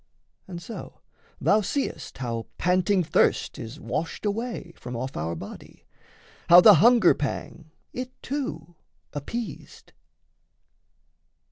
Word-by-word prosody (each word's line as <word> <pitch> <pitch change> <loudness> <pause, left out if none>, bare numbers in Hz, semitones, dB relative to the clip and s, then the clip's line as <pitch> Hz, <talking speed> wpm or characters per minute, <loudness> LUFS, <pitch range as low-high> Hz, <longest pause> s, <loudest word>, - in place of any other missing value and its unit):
And 175 -2 -7
so, 225 +7 -9 0.4
Thou 215 +1 +3
seest 275 +7 -3
how 115 -3 -4
panting 185 +1 +2
thirst - - +1
is 115 +7 -8
washed 165 +4 -4
away 210 -4 -3
From 125 0 -8
off 130 +3 -4
our 80 +2 -3
body, - - -11 0.6
how 175 +1 +11
the 210 +3 +9
hunger 235 -6 +6
pang 155 +2 -5 0.2
It, 255 0 -4
too, 175 - -5 0.4
appeased. 175 - -7
175 Hz, 110 wpm, -26 LUFS, 145-220 Hz, 0.6 s, how